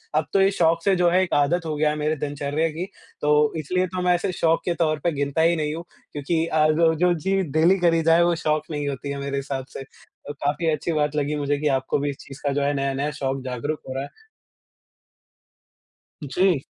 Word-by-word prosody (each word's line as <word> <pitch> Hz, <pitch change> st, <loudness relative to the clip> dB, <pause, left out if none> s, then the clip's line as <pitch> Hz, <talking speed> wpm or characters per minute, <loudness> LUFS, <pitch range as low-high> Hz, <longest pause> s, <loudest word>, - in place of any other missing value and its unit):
अब 155 Hz, -, +2 dB
तो 195 Hz, -, +4 dB
ये 195 Hz, +1 st, +4 dB
शौक 165 Hz, -2 st, +2 dB
से 195 Hz, -2 st, +3 dB
जो 175 Hz, -1 st, +3 dB
है 185 Hz, +2 st, +3 dB
एक 185 Hz, -, -3 dB
आदत 165 Hz, +4 st, +2 dB
हो 155 Hz, -, -2 dB
गया 150 Hz, 0 st, +2 dB
है 150 Hz, -, -1 dB
मेरे 150 Hz, +1 st, 0 dB
दिनचर्या 145 Hz, +2 st, -2 dB
की, 165 Hz, +4 st, -4 dB, 0.4 s
तो 150 Hz, 0 st, +3 dB
इसलिए 180 Hz, +5 st, 0 dB
तो 180 Hz, +1 st, -4 dB
मैं 180 Hz, 0 st, +3 dB
इसे 185 Hz, +2 st, -1 dB
शौक 165 Hz, -2 st, +1 dB
के 175 Hz, -, +1 dB
तौर 155 Hz, -3 st, 0 dB
पे 170 Hz, -, +2 dB
गिनता 140 Hz, +1 st, -1 dB
ही 165 Hz, +1 st, +4 dB
नहीं 150 Hz, -1 st, -2 dB
हूँ, 165 Hz, -, -6 dB, 0.3 s
क्योंकि 160 Hz, +3 st, -1 dB
अ, 155 Hz, -2 st, +2 dB
जो 160 Hz, +1 st, +3 dB
जो 175 Hz, +2 st, +3 dB
चीज़ 190 Hz, +2 st, 0 dB
डेली 170 Hz, +5 st, +4 dB
करी 165 Hz, -2 st, +3 dB
जाए 165 Hz, +1 st, +5 dB
वो 170 Hz, 0 st, +2 dB
शौक 155 Hz, 0 st, +1 dB
नहीं 145 Hz, -1 st, -3 dB
होती 140 Hz, 0 st, -4 dB
है 140 Hz, -, -4 dB
मेरे 140 Hz, 0 st, -3 dB
हिसाब 135 Hz, -1 st, -4 dB
से। -, -, -6 dB, 0.4 s
तो 145 Hz, -, -4 dB
काफ़ी 145 Hz, +3 st, -2 dB
अच्छी 155 Hz, +3 st, -2 dB
बात 150 Hz, -1 st, 0 dB
लगी 150 Hz, 0 st, 0 dB
मुझे 145 Hz, 0 st, 0 dB
कि 150 Hz, -, 0 dB
आपको 130 Hz, -, -2 dB
भी 145 Hz, 0 st, -1 dB
इस 140 Hz, -, -6 dB
चीज़ 135 Hz, 0 st, -11 dB
का 140 Hz, -, +2 dB
जो 145 Hz, -, 0 dB
है 145 Hz, +1 st, +1 dB
नया-नया 140 Hz, +1 st, -1 dB
शौक 135 Hz, -2 st, -3 dB
जागरूक 130 Hz, +5 st, -3 dB
हो 130 Hz, -, -4 dB
रहा 135 Hz, -, -3 dB
है। 140 Hz, -, -8 dB, 2.1 s
जी। 170 Hz, 0 st, +1 dB
155 Hz, 230 wpm, -23 LUFS, 145-170 Hz, 2.1 s, जाए